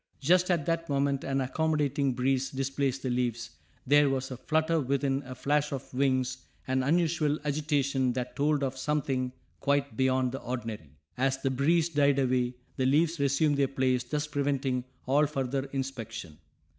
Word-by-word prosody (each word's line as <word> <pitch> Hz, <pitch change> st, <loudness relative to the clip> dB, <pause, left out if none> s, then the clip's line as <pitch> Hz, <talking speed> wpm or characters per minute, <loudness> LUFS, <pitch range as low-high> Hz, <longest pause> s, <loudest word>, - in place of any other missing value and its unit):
Just 180 Hz, +5 st, +3 dB
at 170 Hz, -5 st, +1 dB
that 165 Hz, -1 st, -1 dB
moment 140 Hz, -1 st, +1 dB
an 135 Hz, 0 st, 0 dB
accommodating 145 Hz, -1 st, 0 dB
breeze 130 Hz, +1 st, +1 dB
displaced 135 Hz, 0 st, -2 dB
the 130 Hz, -, -1 dB
leaves; 120 Hz, -1 st, -1 dB, 0.3 s
there 145 Hz, +1 st, +5 dB
was 130 Hz, 0 st, -2 dB
a 130 Hz, -, -5 dB
flutter 160 Hz, +4 st, +1 dB
within, 135 Hz, 0 st, 0 dB
a 130 Hz, -, -7 dB
flash 150 Hz, +2 st, 0 dB
of 135 Hz, -1 st, -6 dB
wings, 130 Hz, -1 st, +1 dB, 0.3 s
an 130 Hz, 0 st, +1 dB
unusual 155 Hz, +1 st, +1 dB
agitation 140 Hz, -3 st, +1 dB
that 125 Hz, 0 st, -4 dB
told 145 Hz, 0 st, +1 dB
of 135 Hz, -1 st, -1 dB
something 130 Hz, -2 st, -1 dB, 0.3 s
quite 140 Hz, -3 st, 0 dB
beyond 130 Hz, 0 st, +2 dB
the 135 Hz, -, -5 dB
ordinary. 110 Hz, -, -6 dB, 0.2 s
As 135 Hz, 0 st, +2 dB
the 135 Hz, 0 st, -1 dB
breeze 155 Hz, +5 st, +2 dB
died 145 Hz, -3 st, +3 dB
away 125 Hz, -2 st, +1 dB, 0.2 s
the 130 Hz, -, +1 dB
leaves 160 Hz, +4 st, +2 dB
resumed 140 Hz, +1 st, +2 dB
their 140 Hz, -1 st, +3 dB
place 130 Hz, -2 st, +1 dB
thus 150 Hz, +4 st, -2 dB
preventing 140 Hz, -3 st, -1 dB, 0.2 s
all 145 Hz, +3 st, +3 dB
further 135 Hz, -1 st, -2 dB
inspection. 115 Hz, -, -6 dB
135 Hz, 160 wpm, -29 LUFS, 130-145 Hz, 0.3 s, there